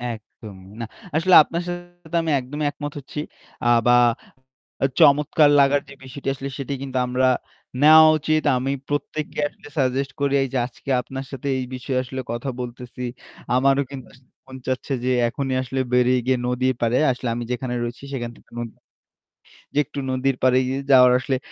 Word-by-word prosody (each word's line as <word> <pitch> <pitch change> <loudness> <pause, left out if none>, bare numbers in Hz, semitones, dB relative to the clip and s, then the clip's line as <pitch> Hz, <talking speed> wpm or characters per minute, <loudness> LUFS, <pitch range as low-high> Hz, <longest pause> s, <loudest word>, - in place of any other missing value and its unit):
একদম। 105 -2 -13 0.2
না, 115 - -3 0.3
আসলে 175 +3 +4
আপনার 170 +3 -4
সাথে 175 -1 -8
আমি 165 -1 -1
একদমই 145 +4 -4
একমত 145 0 -6
হচ্ছি। 140 +2 -8 0.5
আ - - +3 0.2
বা 120 - +6 0.9
আ - - +5
চমৎকার 145 +1 +5
লাগার 140 +1 +4
যে - - -10
বিষয়টি 130 +1 -9
আসলে 135 0 -6
সেটি 140 +1 -3
কিন্তু 130 -1 -4
আমরা 130 +1 +2 0.5
নেওয়া 155 +1 +9
উচিত। 155 +1 0
আমি 130 +2 -1 0.2
প্রত্যেককে 145 +1 -3
আসলে 145 - -15
suggest 135 0 0
করি। 140 -1 +1
এইযে 135 0 -3
আজকে 130 - -13
আপনার 135 +1 -7
সাথে 135 0 -6
এই 130 - -3
বিষয়ে 130 +1 -3
আসলে 130 +1 -5
কথা 120 +4 -3
বলতেছি, 125 +1 -8 0.5
আমারও 135 +2 +3
কিন্তু 130 -4 -8
আসলে 125 0 -22 0.2
মন 130 0 -9
চাচ্ছে 130 +2 -2
যে 130 - +1 0.2
এখনই 135 +1 -3
আসলে 130 +1 -4
বেরিয়ে 125 0 +4
গিয়ে 130 0 +2
নদীর 130 +1 0
পাড়ে 120 +1 +2
আসলে 125 0 -4
আমি 120 - -3
যেখানে 125 0 -3
রয়েছি 120 +3 -6
সেখান 120 -3 -4
থেকে - - -23
নদী 115 -2 -5 1.0
যে 145 - +2
একটু 145 - -7
নদীর 130 0 0
পাড়ে 130 0 +5
গি 130 - -1 0.2
যাওয়ার 125 -1 +7
আসলে 130 +1 -1
130 Hz, 175 wpm, -22 LUFS, 125-140 Hz, 1.0 s, নেওয়া